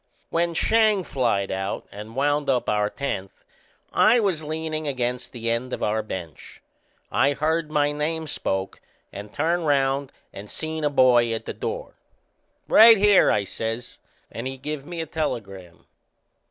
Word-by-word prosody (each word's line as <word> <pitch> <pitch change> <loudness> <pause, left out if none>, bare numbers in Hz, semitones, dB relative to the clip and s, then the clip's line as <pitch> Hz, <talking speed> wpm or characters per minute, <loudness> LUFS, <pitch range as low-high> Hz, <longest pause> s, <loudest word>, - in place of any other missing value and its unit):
When 170 0 0
Schang 215 0 +3
flied 115 - 0
out 95 +1 -3
and 105 +3 -9
wound 145 +1 +1
up 125 -2 +1
our 105 -1 +1
tenth 100 -9 -5 0.5
I 240 +2 +5
was 190 -8 0
leanin' 155 0 -4
against 125 -2 -2
the 115 -1 -3
end 125 +2 -2
of - - -3
our 110 +1 +1
bench. 90 -7 -8 0.5
I 140 +1 +3
heard 155 +2 0
my 145 -1 +1
name 160 +2 -2
spoke, 95 -9 -3 0.3
and 105 +1 -8
I - - -26
turned 165 +2 0
round 135 -1 +1 0.2
and 100 +1 -9
seen 160 0 -4
a 150 - +3
boy 125 -4 +4
at 110 - -6
the - - -4
door. - - -5 0.7
"Right 225 +1 +8
here!" 205 -1 +5
I 105 - +2
says; 115 +4 -5 0.3
and 120 +3 -5
he 135 0 -5
give 145 +1 -6
me 175 -1 -4
a - - -3
telegram. 100 - -5
140 Hz, 160 wpm, -24 LUFS, 115-160 Hz, 0.7 s, Right